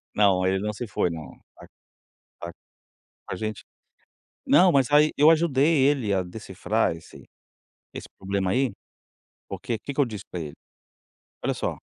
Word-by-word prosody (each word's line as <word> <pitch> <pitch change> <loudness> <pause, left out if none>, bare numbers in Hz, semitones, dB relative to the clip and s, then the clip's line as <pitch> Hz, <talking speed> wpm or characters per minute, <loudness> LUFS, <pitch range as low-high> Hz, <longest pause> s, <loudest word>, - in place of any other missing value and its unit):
Não, 95 -3 +3
ele 95 +1 +1
não 105 +1 -2
se 120 +3 -6
foi 95 -4 -1
não, 80 -2 -8 0.2
tá - - -14 0.8
tá 85 - -6
tá - - -23 0.8
a - - -2
gente. 110 +2 -5 0.8
Não 180 0 +6
mas 135 -4 +2
aí 150 +1 +5
eu 150 +2 +6
ajudei 155 -3 +3
ele 135 -7 +1
a 95 -2 +1
decifrar 105 +1 -2
esse 80 - -14 0.7
esse - - -8
problema 95 -1 -1
aí, 130 +2 +1 0.8
porque 115 - -4
que 140 +6 -7
que 145 - +1
eu - - +3
disse 105 -5 -7
para 90 - -4
ele? 75 -2 -7 0.9
"Olha - - +1
só, - - -3
110 Hz, 160 wpm, -25 LUFS, 95-140 Hz, 0.9 s, Não